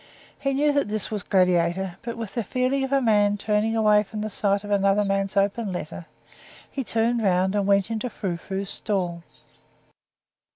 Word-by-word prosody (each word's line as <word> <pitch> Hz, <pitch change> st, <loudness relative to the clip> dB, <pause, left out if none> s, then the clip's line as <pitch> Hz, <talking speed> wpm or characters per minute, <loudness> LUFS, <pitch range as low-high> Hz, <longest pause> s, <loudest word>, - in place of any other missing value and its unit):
He 275 Hz, -1 st, 0 dB
knew 295 Hz, +2 st, +3 dB
that 285 Hz, -4 st, +1 dB
this 215 Hz, 0 st, -3 dB
was 210 Hz, -2 st, -2 dB
Gladiator, 180 Hz, -1 st, +1 dB
but, 235 Hz, -1 st, -6 dB
with 225 Hz, -4 st, -6 dB
the 235 Hz, -, -1 dB
feeling 255 Hz, +5 st, 0 dB
of 265 Hz, -, -3 dB
a 275 Hz, -1 st, +3 dB
man 205 Hz, -2 st, +3 dB
turning 215 Hz, +2 st, 0 dB
away 210 Hz, -1 st, +4 dB
from 210 Hz, +1 st, -6 dB
the 215 Hz, 0 st, -3 dB
sight 200 Hz, 0 st, 0 dB
of 205 Hz, -, -7 dB
another 200 Hz, +1 st, +3 dB
man's 195 Hz, 0 st, -1 dB
open 200 Hz, +1 st, +1 dB
letter, 175 Hz, -1 st, -6 dB, 0.6 s
he 270 Hz, -, -3 dB
turned 230 Hz, +1 st, 0 dB
round 190 Hz, -1 st, +2 dB
and 200 Hz, -1 st, 0 dB
went 200 Hz, +2 st, +2 dB
into 225 Hz, +2 st, -2 dB
Frou 190 Hz, -6 st, -3 dB
Frou's 195 Hz, +3 st, -5 dB
stall. 180 Hz, -5 st, -2 dB
205 Hz, 180 wpm, -24 LUFS, 195-225 Hz, 0.6 s, away